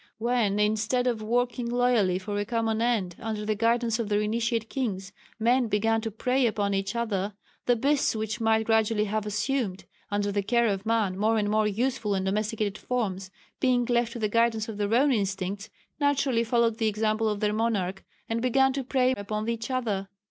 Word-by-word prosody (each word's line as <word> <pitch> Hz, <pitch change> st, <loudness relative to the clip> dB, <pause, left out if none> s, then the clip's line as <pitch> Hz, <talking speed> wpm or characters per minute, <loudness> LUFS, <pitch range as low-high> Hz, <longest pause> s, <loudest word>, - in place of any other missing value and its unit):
When 225 Hz, -3 st, +1 dB
instead 215 Hz, +4 st, +1 dB
of 235 Hz, -3 st, 0 dB
working 245 Hz, +2 st, 0 dB
loyally 240 Hz, -7 st, +2 dB
for 205 Hz, +2 st, -4 dB
a -, -, 0 dB
common 225 Hz, 0 st, -1 dB
end, 215 Hz, -7 st, 0 dB
under 215 Hz, -1 st, -4 dB
the 215 Hz, -, +1 dB
guidance 230 Hz, +1 st, +1 dB
of 225 Hz, -3 st, -2 dB
their 205 Hz, 0 st, +2 dB
Initiate 225 Hz, +1 st, -1 dB
kings, 200 Hz, -7 st, -3 dB, 0.2 s
men 240 Hz, +2 st, +2 dB
began 225 Hz, +2 st, +1 dB
to 225 Hz, -, -3 dB
prey 250 Hz, +4 st, +1 dB
upon 205 Hz, -2 st, -1 dB
each 195 Hz, +2 st, -2 dB
other, 205 Hz, -4 st, -2 dB, 0.3 s
the 245 Hz, -, +5 dB
beasts 275 Hz, +2 st, +1 dB
which 220 Hz, +1 st, -3 dB
might 220 Hz, 0 st, +2 dB
gradually 220 Hz, -1 st, +2 dB
have 215 Hz, 0 st, -2 dB
assumed, 210 Hz, -2 st, -2 dB, 0.2 s
under 205 Hz, 0 st, 0 dB
the 200 Hz, 0 st, 0 dB
care 235 Hz, +4 st, +2 dB
of 200 Hz, -1 st, -1 dB
man, 220 Hz, -5 st, +1 dB
more 220 Hz, +2 st, +2 dB
and 205 Hz, -1 st, 0 dB
more 215 Hz, 0 st, +2 dB
useful 220 Hz, -1 st, -1 dB
and 190 Hz, 0 st, -1 dB
domesticated 210 Hz, +1 st, -1 dB
forms, 195 Hz, -6 st, -2 dB, 0.3 s
being 250 Hz, -2 st, +2 dB
left 235 Hz, -1 st, +1 dB
to -, -, -6 dB
the 220 Hz, -2 st, 0 dB
guidance 225 Hz, 0 st, +1 dB
of 220 Hz, -2 st, -6 dB
their 205 Hz, 0 st, -1 dB
own 275 Hz, +4 st, +4 dB
instincts 195 Hz, -1 st, -2 dB, 0.3 s
naturally 280 Hz, -5 st, +2 dB
followed 230 Hz, -1 st, +1 dB
the 225 Hz, -, +2 dB
example 215 Hz, +1 st, +1 dB
of 210 Hz, -1 st, -2 dB
their 210 Hz, 0 st, +1 dB
monarch, 200 Hz, -4 st, -1 dB, 0.2 s
and 225 Hz, 0 st, -1 dB
began 265 Hz, +2 st, +3 dB
to 275 Hz, 0 st, -2 dB
prey 255 Hz, 0 st, +2 dB
upon 215 Hz, +1 st, -4 dB
each 230 Hz, 0 st, -3 dB
other. 215 Hz, -7 st, -2 dB
220 Hz, 190 wpm, -27 LUFS, 205-235 Hz, 0.3 s, the